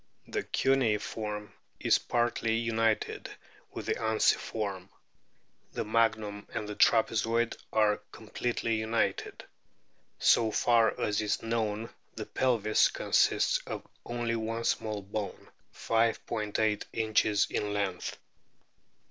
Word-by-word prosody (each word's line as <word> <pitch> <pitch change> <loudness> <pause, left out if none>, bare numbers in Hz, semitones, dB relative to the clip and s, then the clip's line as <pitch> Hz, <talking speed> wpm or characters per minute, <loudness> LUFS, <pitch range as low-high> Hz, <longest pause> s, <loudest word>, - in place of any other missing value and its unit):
The - - -2
cuneiform 105 -4 0 0.3
is - - +3
partly 120 -1 0
united 115 -1 0 0.4
with - - -6
the - - +1
unciform; 105 -3 0 0.8
the - - -2
magnum 110 -2 0
and 105 - -3
the 105 - -4
trapezoid 115 +2 +2 0.2
are 105 -1 +3
com 110 - -13
pletely 115 -1 -1
united. 110 +1 -1 0.7
So 115 - +4
far 115 0 +3
as 105 0 0
is 105 -1 -1
known 115 -1 -2 0.2
the - - -5
pelvis 115 -5 +2
consists - - +2
of - - -5 0.2
only 120 -1 -2
one 115 +1 -3
small 105 -3 -1
bone, 100 +1 -5 0.2
5 115 0 +1
'8 105 -1 0
inches 110 -2 +2
in 105 0 -1
length. 100 -3 -2
110 Hz, 110 wpm, -30 LUFS, 105-115 Hz, 0.8 s, So